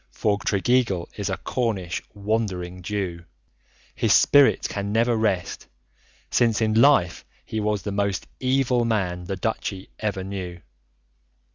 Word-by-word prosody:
For 100 Hz, -1 st, 0 dB
Tregeagle 100 Hz, -4 st, +1 dB
is 100 Hz, -1 st, -3 dB
a 95 Hz, -, -2 dB
Cornish 100 Hz, -5 st, -2 dB
"Wandering 100 Hz, -4 st, -2 dB
Jew"; 90 Hz, -3 st, -4 dB, 0.7 s
his -, -, +2 dB
spirit 145 Hz, -1 st, +5 dB
can 100 Hz, 0 st, -4 dB
never 115 Hz, +2 st, +2 dB
rest, 100 Hz, -5 st, -1 dB, 0.6 s
since 115 Hz, -3 st, +3 dB
in 110 Hz, -1 st, +1 dB
life 135 Hz, -, +4 dB, 0.2 s
he 110 Hz, -, -3 dB
was 105 Hz, -2 st, -1 dB
the 100 Hz, -, -3 dB
most 100 Hz, -1 st, -1 dB
evil 130 Hz, -2 st, +2 dB
man 95 Hz, -6 st, -1 dB
the 95 Hz, -, -3 dB
Duchy 95 Hz, -1 st, -4 dB
ever 100 Hz, -3 st, -2 dB
knew. 95 Hz, -2 st, -6 dB
100 Hz, 130 wpm, -24 LUFS, 95-115 Hz, 0.7 s, spirit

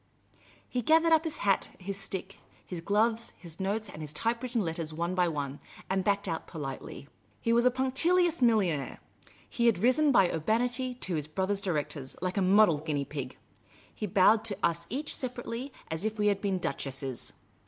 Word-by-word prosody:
He 250 Hz, -, -2 dB
gathered 320 Hz, +6 st, +4 dB
up 320 Hz, +1 st, +4 dB
his 320 Hz, -, -2 dB
hat, 195 Hz, -1 st, +2 dB
his 195 Hz, +1 st, -5 dB
stick, 195 Hz, 0 st, -5 dB, 0.3 s
his 175 Hz, -3 st, -6 dB
gloves, 220 Hz, +5 st, +1 dB
his 170 Hz, -2 st, -8 dB
notes, 205 Hz, +3 st, -1 dB
and 160 Hz, -, -9 dB
his 150 Hz, -1 st, -5 dB
typewritten 230 Hz, +7 st, -1 dB
letters, 165 Hz, -3 st, -2 dB
one 170 Hz, +3 st, -2 dB
by 180 Hz, -1 st, +2 dB
one, 145 Hz, -3 st, -3 dB, 0.3 s
and 190 Hz, 0 st, +1 dB
backed 200 Hz, +1 st, +1 dB
out 165 Hz, -, -3 dB
politely. 140 Hz, -3 st, -7 dB, 0.3 s
He 230 Hz, -, +1 dB
was 240 Hz, +1 st, +5 dB
a -, -, +7 dB
punctilious 315 Hz, +7 st, +2 dB
millionaire. 195 Hz, -, +2 dB, 0.5 s
He 235 Hz, -1 st, +1 dB
had 230 Hz, -, +4 dB
risen 255 Hz, +9 st, +4 dB
by 190 Hz, -8 st, +5 dB
urbanity 245 Hz, -, 0 dB
to 190 Hz, -7 st, -3 dB
his 150 Hz, -2 st, 0 dB
brother 190 Hz, +5 st, -1 dB
directors, 150 Hz, -8 st, -3 dB
like 185 Hz, +2 st, -2 dB
a -, -, +3 dB
model 190 Hz, -4 st, +5 dB
guinea 145 Hz, -2 st, -2 dB
pig. 135 Hz, -3 st, -6 dB, 0.6 s
He 210 Hz, -, -4 dB
bowed 205 Hz, +4 st, +5 dB
to 205 Hz, -4 st, -2 dB
us 170 Hz, 0 st, 0 dB
each 285 Hz, +6 st, -1 dB
separately 250 Hz, +1 st, -4 dB, 0.2 s
as 160 Hz, +3 st, -3 dB
if 220 Hz, 0 st, -2 dB
we 210 Hz, 0 st, +3 dB
had 200 Hz, -1 st, 0 dB
been 195 Hz, -2 st, 0 dB
duchesses. 135 Hz, -6 st, -4 dB
200 Hz, 180 wpm, -30 LUFS, 165-235 Hz, 0.6 s, a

